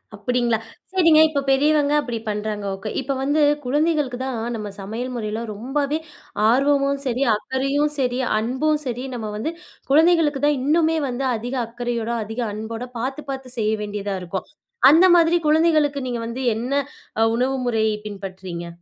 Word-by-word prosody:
அப்பிடிங்களா? 240 +2 0 0.3
சரிங்க, 330 -5 +5
இப்போ 285 -2 -1
பெரியவங்க 290 +2 +3
அப்டி 240 -5 -4
பண்றாங்க, 210 0 -3
ஓகே! 195 +2 -6
இப்போ 270 +1 -2
வந்து, 290 +3 +2 0.2
குழந்தைகளுக்கு 295 -2 +1
தான் 260 -2 -3 0.2
நம்ம 210 -2 -5
சமையல் 225 +6 -4
முறையில 220 -1 -3
ரொம்பவே 280 +7 -1 0.5
ஆர்வமும் 275 +2 +2
சரி, 255 +1 0
அக்கறையும் 275 +6 0
சரி, 250 -1 0 0.2
அன்பும் 265 +7 0
சரி 250 0 -3
நம்ம 220 -3 -4
வந்து, 245 +10 -2 0.4
குழந்தைகளுக்கு 315 -2 +4
தான் 295 -1 +2
இன்னுமே 320 +3 +2
வந்து, 250 +2 -2
அதிக 240 +4 -4
அக்கறையோட, 235 0 -3
அதிக 225 +3 -4
அன்போட 225 +3 -5
பாத்து 265 +5 -3
பாத்து 265 -2 -5
செய்ய 215 -1 +1
வேண்டியதா 205 -1 -3
இருக்கும். 180 +1 -5 0.4
அந்த 330 +5 +6
மாதிரி 335 +1 +4
குழந்தைகளுக்கு, 305 -2 +3
நீங்க 240 -2 -3
வந்து 245 +3 -4
என்ன 245 +4 -3 0.5
அ - - +6
உணவு 260 +2 +1
முறையை 220 -2 +1
பின்பற்றுறீங்க? 190 -4 -7
255 Hz, 145 wpm, -22 LUFS, 220-290 Hz, 0.5 s, அந்த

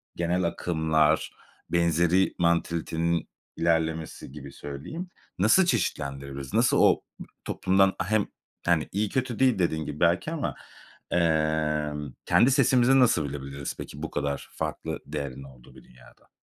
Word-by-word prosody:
genel 85 +1 0
akımlar, 80 -2 +1 0.4
benzeri 85 +2 +2
mantalitenin 85 0 0 0.3
ilerlemesi 80 -4 -1
gibi 70 -1 -9
söyleyim, 75 - -7 0.3
nasıl 110 - +5
çeşitlendirebiliriz? 70 - -2
Nasıl - - +3
o, - - +5 0.2
b - - -7 0.2
toplumdan, 95 +1 +2
a 95 - -1
hem, 110 -2 +2 0.4
hani, 85 -3 +2
iyi 105 +2 0
kötü 125 -2 -2
değil 130 -6 +3
dediğin 80 -3 0
gibi 75 0 -6
belki 85 - +2
ama, 110 - -3 0.6
emm, 75 -3 0
kendi 125 - +4
sesimizi 130 -1 +4
nasıl 115 - +4
bilebiliriz 70 0 -6
peki - - -8
bu - - -4
kadar 70 -1 -3
farklı - - -4
değerin 70 -2 -5
olduğu 65 -1 -16
bir 65 - -15
dünyada? 65 - -20
80 Hz, 130 wpm, -27 LUFS, 75-95 Hz, 0.6 s, nasıl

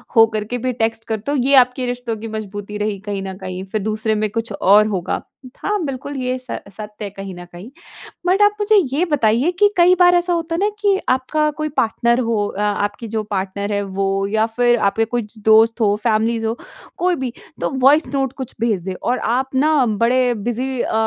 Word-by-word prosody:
हो 225 -1 +8
करके 215 +3 -2
भी 255 +1 -2
टेक्स्ट 225 0 0
करते 220 +4 -3
हो 290 - +1
ये 270 +2 +3
आपके 250 0 +4
रिश्तों 245 -2 -3
की 220 +2 -7
मज़बूती 210 -1 -6
रही 210 -1 -2
कहीं 200 -2 -3
न 190 0 -5
कहीं। 185 -1 -6
फिर 215 - -1
दूसरे 215 +1 -1
में 215 0 0
कुछ 225 +2 -4
और 205 +3 +4
होगा। 190 -5 -2 0.4
हाँ, 410 -3 0
बिल्कुल 280 +1 -5
ये 255 0 -1
स 255 - -6 0.2
सत्य 210 0 -8
है - - -5
कहीं 195 -1 -8
न 175 0 -9
कहीं। 180 +6 -10 0.6
बट 375 +3 +3
आप 415 0 +5
मुझे 420 +1 +3 0.2
ये 335 +5 +2
बताइए 250 +3 +2
कि 410 0 +6
कई 355 +1 +6
बार 355 0 +6
ऐसा 350 0 +1
होता 330 -1 -2
न 410 - +3
कि 400 -2 +3
आपका 285 +4 +1
कोई 305 0 -2
पार्टनर 235 +2 +2
हो 230 -4 0
अ 205 - -5 0.3
आपकी 225 +3 -10
जो 220 0 -2
पार्टनर 200 0 -3
है 205 - 0
वो 195 0 -1
या 215 +2 +1
फ़िर 240 +1 +2
आपके 225 +3 0
कुछ 225 -1 -4
दोस्त 225 +2 +5
हों, 205 -2 +3
फैमिलीज़ 225 +1 0
हों। 225 +1 -1 0.4
कोई 360 0 +1
भी। 260 -6 -4 0.3
तो - - 0
वॉइस 285 +5 +5
नोट 270 -2 0
कुछ 260 -3 -6
भेज 225 -5 0
दें 190 +1 -4
और 250 +1 0
आप 255 +3 0
न 305 +4 +3 0.2
बड़े 245 +2 +2
बिज़ी 240 +4 -3
अ, - - -2
230 Hz, 210 wpm, -19 LUFS, 210-265 Hz, 0.6 s, हो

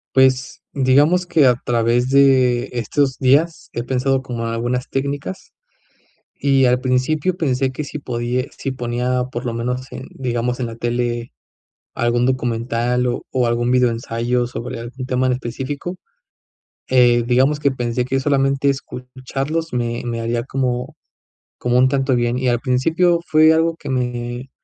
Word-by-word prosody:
Pues, 130 -1 +2
digamos 145 +7 +3
que 155 -5 +4
a 125 - +6
través 120 +1 +1
de 130 -3 +4
estos 130 +3 0
días 145 +6 +2
he 120 - -3
pensado 130 +1 0
como 120 -3 -4
algunas 120 +2 -2
técnicas, 135 -7 -4 0.8
y 135 -1 +3
al 125 0 +2
principio 140 +8 0
pensé 135 -4 0
que 140 +3 -5
si 150 - -6
podi 125 0 -2
si 135 - -3
ponía 125 0 -1
por 120 +1 -5
lo 120 - -2
menos 125 +3 -3
en, 130 - -7
digamos, 125 -1 -2
en 125 - -1
la 115 -1 -6
tele 120 0 -2 0.6
algún 120 +1 +1
documental 125 -1 0
o 120 -1 -2
o 130 -2 +1
algún 120 +1 0
videoensayo 120 0 +1
sobre 120 -1 -6
algún 125 +2 -7
tema 130 0 0
en 125 - +2
específico, 135 +8 -5 0.9
eh, 120 -2 +4
digamos 135 +5 +2
que 140 - +2
pensé 125 -1 -2
que 135 +1 -1
solamente 135 0 +1
escucharlos 135 +4 -4
me 120 -1 -2
me 115 -1 -3
haría 115 +1 -1
como 125 -1 -2 0.6
como 125 0 +1
un 130 +1 +5
tanto 135 -1 +1
bien, 120 +1 0
y 130 - -1
al 120 -1 +2
principio 160 +7 +2
fue 155 +1 +6
algo 165 +1 +2
que - - -8
me 125 0 -3
125 Hz, 155 wpm, -20 LUFS, 120-135 Hz, 0.9 s, a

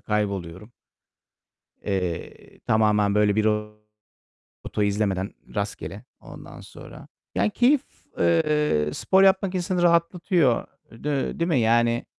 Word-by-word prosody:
kayboluyorum. 100 -1 -3 1.1
Eee, 90 -4 -5
tamamen 105 -2 +2
böyle 105 -1 +3
bir 110 0 +1
rota 105 0 -4 0.8
izlemeden, 100 -2 -1 0.2
rastgele. 105 0 -5 0.2
Ondan - - -12
sonra, - - -13 0.3
yani 100 +3 +2
keyif, 255 +3 +3 0.4
eee, 150 - +2
spor 190 - +3
yapmak 190 0 +3
insanı 180 0 -1
rahatlatıyor. 170 - +2 0.2
D 140 +6 -3
değil 170 +1 0
mi 145 - +2
yani? 115 +1 +2
110 Hz, 105 wpm, -24 LUFS, 105-170 Hz, 1.1 s, böyle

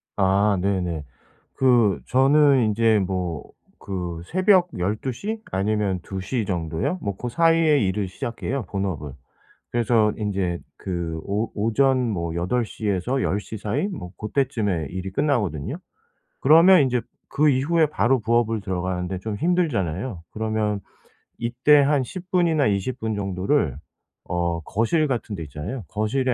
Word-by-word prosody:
아 100 +1 +3
네네. 90 -5 -1 0.5
그 120 -7 +3
저는 135 -1 +4
인제 110 0 +3
뭐 90 -4 -3 0.4
그 90 -3 -4
새벽 185 0 +4
12 105 +8 -1
시? 215 - -5
아니면 100 -1 0
2 95 -1 -5
시 115 +3 -2
정도요? 85 - -2
뭐 100 -2 -3
고 125 - -5
사이에 165 +2 +3
일을 95 0 0
시작해요 120 +7 -4
본업을. 95 -7 -3 0.6
그래서 115 -2 +2
인제 95 -5 -1 0.2
그 85 -3 -4
오 105 +3 -2
오전 125 +3 +2
뭐 85 -5 -2
8 90 +9 0
시에서 105 +6 -2
10 100 +2 0
시 110 - -7
사이? 105 - -1
뭐 120 - -7
고때쯤에 105 - -1
일이 95 +1 -5
끝나거든요. 105 - -1 0.7
그러면 165 +5 +7
인제 125 -2 +1 0.3
그 150 +2 +2
이후에 150 +4 +3
바로 135 -3 +2
부업을 115 0 +1
들어가는데 90 -1 -3
좀 105 +1 -4
힘들잖아요. 115 - -1
그러면 110 -2 -1 0.6
이때 125 +5 +4
한 140 -1 +2
10 180 +8 -9
분이나 165 -6 +3
20 100 +5 -1
분 110 0 -2
정도를 95 - 0 0.5
어 85 -1 -1
거실 115 - +1
같은 120 -5 -3
데 85 - -5
있잖아요. 75 - -6
거실에 125 +5 0
110 Hz, 260 characters per minute, -23 LUFS, 95-135 Hz, 0.7 s, 그러면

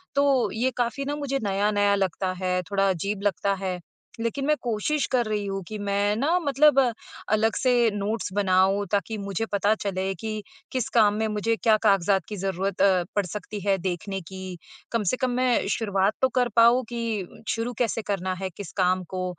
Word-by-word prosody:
तो 280 -3 +3
ये 250 +4 0
काफ़ी 245 +3 -1
ना 290 +1 -2
मुझे 280 -2 -2
नया-नया 205 0 +2
लगता 190 -1 -1
है, 180 0 +1
थोड़ा 195 0 +2
अजीब 195 +3 -2
लगता 200 0 +1
है। 185 -1 -2 0.4
लेकिन 230 +4 -2
मैं 300 +1 +3
कोशिश 245 +6 0
कर 245 -2 +2
रही 210 -1 -2
हूँ, 195 0 -3
कि 215 - -5
मैं 205 +1 0
ना 295 +10 +2
मतलब 290 -2 +4 0.5
अलग 220 +1 +2
से 245 -3 +3
नोट्स 205 +1 -2
बनाऊँ, 195 0 +3
ताकि 205 +2 0
मुझे 200 +1 -3
पता 205 +1 +2
चले 190 -1 -1
कि, 215 +3 -5 0.3
किस 255 -3 -1
काम 210 -3 +5
में 220 0 0
मुझे 215 +2 0
क्या 220 -1 +3
कागज़ात 195 -2 +3
की 210 - -4
ज़रूरत 195 0 -2
अ, 190 -2 +4
पड़ 205 -2 +1
सकती 210 +3 -6
है 195 -1 +3
देखने 190 +1 -3
की, 185 +1 -8 0.3
कम 230 -2 0
से 255 - -1
कम 255 -1 0
मैं 250 -3 +2
शुरुआत 200 -2 +1
तो 260 - +4
कर 250 -1 +2
पाऊँ 235 +2 +6
कि 230 -6 -4
शुरू 235 +2 -1
कैसे 230 -2 0
करना 190 -3 -2
है 190 - -2
किस 200 -6 -7
काम 185 0 +2
को 185 0 -2
205 Hz, 190 wpm, -25 LUFS, 195-235 Hz, 0.5 s, पाऊँ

